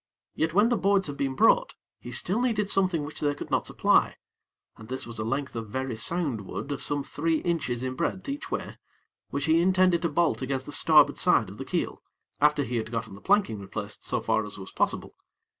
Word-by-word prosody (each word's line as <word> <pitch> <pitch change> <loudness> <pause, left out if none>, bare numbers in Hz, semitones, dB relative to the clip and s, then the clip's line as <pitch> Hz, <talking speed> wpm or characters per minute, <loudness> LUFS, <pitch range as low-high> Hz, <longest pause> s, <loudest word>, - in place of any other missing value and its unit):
Yet 160 +1 -1
when 210 +3 +5
the 240 - +2
boards 195 +1 +2
had 145 - -5
been 135 -1 -1
brought, - - +3 0.2
he 120 - -9 0.2
needed 215 -3 +1
still 195 - +5
something 165 -5 -2
which 150 - -7
they 145 -1 0
could - - -8
not - - +1
supply, - - +3 0.6
and 110 - -13
this 130 +1 -4
was 115 -2 -8
a - - -1
length 135 +4 -3
of 115 -1 -4
very 130 +1 -3
sound 140 0 0
wood 120 +8 -6
of 140 - -3
some 145 -1 0
three 160 +3 -1
inches 140 -9 -1
in 130 0 -2
breadth 170 +6 -3
each 280 +2 -5
way, - - -5 0.5
which 140 0 -2
he 160 +1 +4
intended 185 -1 +3
to 170 - 0
bolt 145 -6 +1
against 130 0 -2
the - - -7
starboard - - +5
side - - +3
of - - -12
the - - -5
keel, - - -2 0.4
after 150 0 +3
he 125 -1 -3
had 110 0 -3
gotten 115 -3 -4
the 100 - -12
planking 195 - +2
replaced 100 +1 -7
so - - 0
far 110 -1 +1
as 105 -1 -8
was 95 -1 -9
possible. - - -1
145 Hz, 220 wpm, -27 LUFS, 115-175 Hz, 0.6 s, when